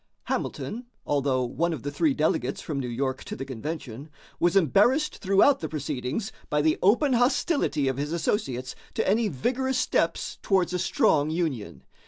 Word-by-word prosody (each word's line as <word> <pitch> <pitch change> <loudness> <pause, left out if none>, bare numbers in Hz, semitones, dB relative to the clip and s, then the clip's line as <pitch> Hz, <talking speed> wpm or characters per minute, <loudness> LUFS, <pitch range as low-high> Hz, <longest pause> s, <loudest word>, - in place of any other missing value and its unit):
Hamilton, 240 +3 -4 0.2
although 135 -3 +1
one 165 +8 -1
of 150 - -6
the 145 - -3
three 150 -1 +1
delegates 135 -4 0
from 145 -3 -4
New 130 - -3
York 130 +2 -2
to - - -5
the 135 - -5
convention, 140 +1 -6 0.3
was 175 +2 +2
embarrassed 210 - +3
throughout 200 +8 +4
the 160 - -4
proceedings 150 - -3 0.2
by 150 - +1
the 155 +1 +2
open 245 +8 +4
hostility 245 - +2
of 130 -1 0
his 145 +2 -2
associates 135 - -1 0.2
to - - 0
any 220 +3 +3
vigorous 255 - -1
steps - - 0
towards 185 -3 +1
a 180 - 0
strong 150 -3 +2
union. 155 -10 -3
155 Hz, 165 wpm, -26 LUFS, 135-200 Hz, 0.3 s, throughout